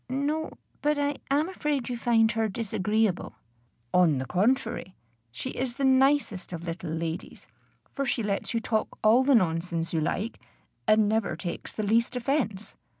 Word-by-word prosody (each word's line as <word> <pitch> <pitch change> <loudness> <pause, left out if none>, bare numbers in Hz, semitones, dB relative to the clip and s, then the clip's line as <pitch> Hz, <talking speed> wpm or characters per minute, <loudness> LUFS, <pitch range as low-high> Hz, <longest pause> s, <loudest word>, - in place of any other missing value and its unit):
"No; 290 +4 -1 0.3
but 295 0 +2
I 285 0 0
am 290 +4 +2
afraid 295 -8 -2
you 245 - -2
find 230 -2 +3
her 225 -1 0
disagreeable." 210 - -1 0.6
"On 170 -6 +4
the 130 - -2
contrary, 220 - 0 0.4
she 255 - -5
is 250 -1 -3
the 275 0 0
nicest 265 -8 +3
of 170 -1 -5
little 170 0 -5
ladies; 165 +1 -4 0.5
for 275 - -2
she 245 -3 0
lets 200 -1 -1
you 230 - +1
talk 220 -1 -2
all 225 +4 +6
the 275 0 +5
nonsense 170 -3 0
you 160 - +1
like, 210 +8 -2 0.5
and 215 -1 +5
never 220 0 0
takes 175 -3 -5
the 215 - -3
least 230 +4 +2
offence." 245 -6 -1
225 Hz, 160 wpm, -27 LUFS, 185-265 Hz, 0.6 s, all